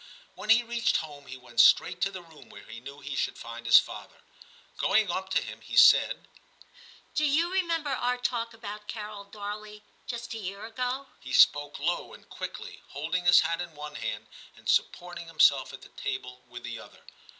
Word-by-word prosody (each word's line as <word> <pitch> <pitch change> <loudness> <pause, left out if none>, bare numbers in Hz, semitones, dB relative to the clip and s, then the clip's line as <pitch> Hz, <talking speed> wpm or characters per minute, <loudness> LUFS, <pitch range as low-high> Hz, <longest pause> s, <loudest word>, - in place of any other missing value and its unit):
When 215 - -10
he 230 +2 +6
reached 235 0 +1
home 145 -3 -8
he 130 - -8
went 120 -2 -7
straight 180 +8 +5
to 195 - +2
the 185 -2 -9
room 160 -2 -17
where 100 - -12
he 110 +3 -10
knew 140 +3 -11
he 140 0 -5
should - - -1
find 120 0 -8
his 120 - +9
father. - - -2 0.6
Going 210 -3 +3
up 190 +2 -3
to 190 - +1
him, - - -9
he - - -7
said, - - +6 0.4
' 480 -1 -23
Do 305 - 0
you 315 +4 +2
remember 335 -6 0
our 250 -1 0
talk 235 -2 -2
about 210 -2 -8
Carol 210 -2 -7
Darley, 210 +1 -8 0.2
just 235 0 -5
a 225 - -5
year 200 0 -6
ago 250 +4 -3
?* - - -33
He 130 - -9
spoke 145 0 +5
low - - -2
and - - -18
quickly, - - -7
holding 165 +5 -3
his 180 - +8
hat 170 +1 -1
in 170 -3 -7
one 150 0 -8
hand - - -4 0.3
and - - -14
supporting 175 -1 0
himself 145 -5 +4
at - - -11
the - - -13
table 125 0 -5
with 120 0 -10
the 120 -1 -6
other. - - -15
190 Hz, 200 wpm, -28 LUFS, 145-230 Hz, 0.6 s, his